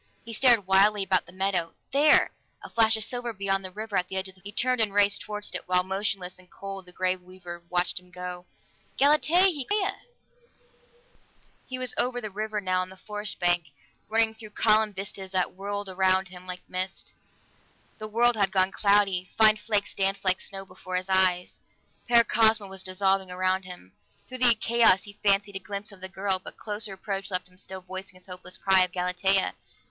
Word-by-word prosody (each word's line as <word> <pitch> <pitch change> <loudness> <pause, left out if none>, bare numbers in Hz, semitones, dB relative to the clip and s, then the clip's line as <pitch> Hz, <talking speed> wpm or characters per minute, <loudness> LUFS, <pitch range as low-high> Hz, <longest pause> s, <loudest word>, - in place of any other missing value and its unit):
He 230 - -7
stared 235 -3 +5
wildly 195 +2 +4
about 185 -1 +1
the - - -13
meadow 185 -3 -1 0.2
there! 290 +3 +5 0.3
A - - -10
flash 225 -1 +4
of 220 - 0
silver 245 0 -4
beyond 195 -1 -1
the 185 - -5
river, 215 +2 -6
at 180 -1 +1
the 190 - -7
edge 190 0 -1
of 190 - -10
the 185 - -24
forest. - - -35
He - - -7
turned 250 +2 +2
and 205 -2 +1
raced 205 -1 +3
toward 210 -1 -6
it, - - -5
while 180 0 +3
motionless 190 -1 -3
and 180 -1 -19
cold 195 -1 -8
the - - -12
Grey 185 +1 0
Weaver 180 -1 -11
watched 180 0 0
him 180 0 -22
go. 180 0 -7 0.5
"Galatea!" 300 +4 +4 0.2
he 285 -3 -3
called. 415 +11 0
"Galatea!" 385 - -2 1.7
He 255 - -5
was 255 -1 -2
over 245 0 +1
the 215 -3 -6
river 215 +1 -3
now, 185 -2 0
on 185 - -5
the 190 - -13
forest 210 +1 -4
bank, 175 -2 +2 0.4
running 225 0 +3
through 220 -1 -12
columned 215 -1 +2
vistas 195 0 -5
that 185 -1 0
whirled 200 +1 -4
about 190 0 +1
him 185 0 -12
like 180 0 -7
mist. 185 +1 -4 0.9
The 215 - -6
world 235 +2 +3
had 200 -3 +2
gone 190 0 +2
cloudy; 200 -3 +2
fine 215 -1 +6
flakes 210 -2 -1
danced 195 0 0
like 185 0 +2
snow 195 0 -6
before 185 0 -8
his 185 +1 -2
eyes; 185 -1 +1 0.5
Paracosma 225 -2 +4
was 190 -1 -6
dissolving 190 0 0
around 185 +1 -1
him. 180 - -11 0.3
Through 255 0 -8
the 245 -2 +6
chaos 225 -3 +4
he 205 0 -11
fancied 200 0 +2
a - - -6
glimpse 200 +1 -5
of 195 -2 -14
the 190 - -6
girl, 190 0 0
but - - -10
closer 210 0 -3
approach 195 0 -3
left 180 -2 -2
him 180 0 -24
still 190 0 -5
voicing 190 +1 -7
his 185 0 -12
hopeless 180 0 -5
cry 190 -1 +4
of 180 - -3
"Galatea!" 180 +2 +1
195 Hz, 200 wpm, -26 LUFS, 185-215 Hz, 1.7 s, fine